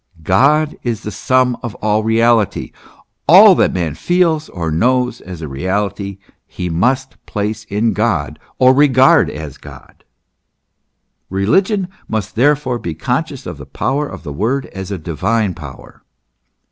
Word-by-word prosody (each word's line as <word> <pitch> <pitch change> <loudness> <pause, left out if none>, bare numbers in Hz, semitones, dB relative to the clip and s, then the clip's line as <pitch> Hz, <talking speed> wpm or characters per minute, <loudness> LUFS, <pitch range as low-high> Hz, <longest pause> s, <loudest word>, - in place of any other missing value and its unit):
* - - -20
God 150 +8 +3
is 115 -4 -3
the 105 - -5
sum 125 +4 +1
of 120 -4 -6
all 110 0 0
reality. 115 -1 +1 0.6
All - - +9
that - - +2
man 85 -5 -2
feels 165 - +1
or 80 -3 -4
knows 125 +7 +1
as 90 -3 -9
a - - -4
reality, 100 +6 -3 0.3
he 90 -1 -5
must 130 +10 -1
place 105 +1 -3
in 110 +3 0
God 105 -10 -1 0.2
or 130 0 +5
regard 135 -2 +5
as 75 -3 -8
God. - - -14 1.3
Religion 185 - +1 0.2
must 110 -3 -3
therefore 130 0 +1
be 85 -6 -5
conscious 80 - -3
of - - -6
the - - -9
power 145 +2 -2
of - - -10
the 75 -4 -6
word 125 - -1
as 95 -1 -6
a 100 - -3
divine 95 +6 -1
power. 75 -7 -12
110 Hz, 145 wpm, -17 LUFS, 90-130 Hz, 1.3 s, All